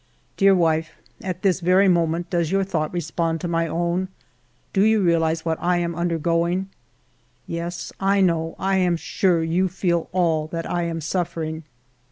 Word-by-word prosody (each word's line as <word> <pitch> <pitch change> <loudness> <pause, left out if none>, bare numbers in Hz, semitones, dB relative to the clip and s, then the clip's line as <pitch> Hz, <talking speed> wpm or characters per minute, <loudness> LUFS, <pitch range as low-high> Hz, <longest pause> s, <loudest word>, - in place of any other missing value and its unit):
Dear 195 -1 +5
wife, 165 -2 +1 0.3
at 185 0 -5
this 190 -2 +2
very 185 +3 +4
moment 170 -1 +1
does 170 -3 0
your 195 0 +2
thought 160 -5 -2
respond 165 -1 -2
to - - -2
my 165 -1 0
own 175 +3 -1
P - - -30 0.6
Do 195 - +3
you 220 0 +4
realize 165 -1 +1
what 160 -1 -1
1 175 0 +2
am 170 0 -1
undergoing? 170 +2 0 0.8
Yes, 170 +1 -5
I 195 +1 +2
know, 165 -3 +1
I 195 0 +1
am 180 -2 +2
sure, 170 0 +1
you 175 +4 +1
feel 175 -2 -1
all 165 -4 +1
that 165 0 -4
I 175 -1 -1
am 165 -1 -3
suffering. 165 -2 -3
170 Hz, 170 wpm, -23 LUFS, 165-185 Hz, 0.8 s, Dear